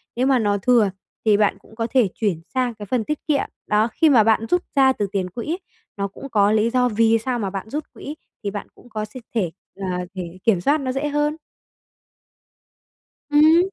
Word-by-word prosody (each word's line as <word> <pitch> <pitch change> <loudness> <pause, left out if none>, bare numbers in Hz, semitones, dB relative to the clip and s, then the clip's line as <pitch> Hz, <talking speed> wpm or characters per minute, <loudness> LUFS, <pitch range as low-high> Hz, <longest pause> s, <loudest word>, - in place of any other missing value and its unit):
Nếu 250 +2 +1
mà 265 -2 +4
nó 205 -2 +1
thừa, 225 0 +4 0.4
thì 210 -2 +5
bạn 205 -2 +2
cũng 220 - -19
có 230 0 -1
thể 255 -6 +4
chuyển 195 -7 -1
sang 255 -2 0
cái 210 -2 -9
phần 230 +3 0
tiết 300 +5 -2
kiệm. 295 -3 +2 0.2
Đó, 210 +1 +3
khi 320 - +4
mà 245 -6 +6
bạn 225 +1 +3
rút 355 +1 +2
ra 265 -1 +5
từ 205 -5 -2
tiền 190 -3 -1
quỹ, 245 - -3 0.4
nó 200 0 -1
cũng 275 +8 -10
có 205 -3 +3
lý 220 +1 +3
do 250 0 +2
vì 225 0 +3
sao 245 +2 -2
mà 200 -3 -1
bạn 195 +2 -6
rút 300 +5 -3
quỹ 295 - -7 0.3
thì 200 - -2
bạn 205 0 -6
cũng 245 - -18
có 215 -2 -3
s 215 +4 -12 0.2
thể 185 -7 +1 0.2
là 180 -2 -3
để 180 -2 -6
kiểm 200 -6 +3
soát 290 +9 +2
nó 260 -1 -1
dễ 270 +3 -1
hơn. 295 +1 0 2.0
Ừm. 310 +3 +6
225 Hz, 215 wpm, -22 LUFS, 205-265 Hz, 2.0 s, mà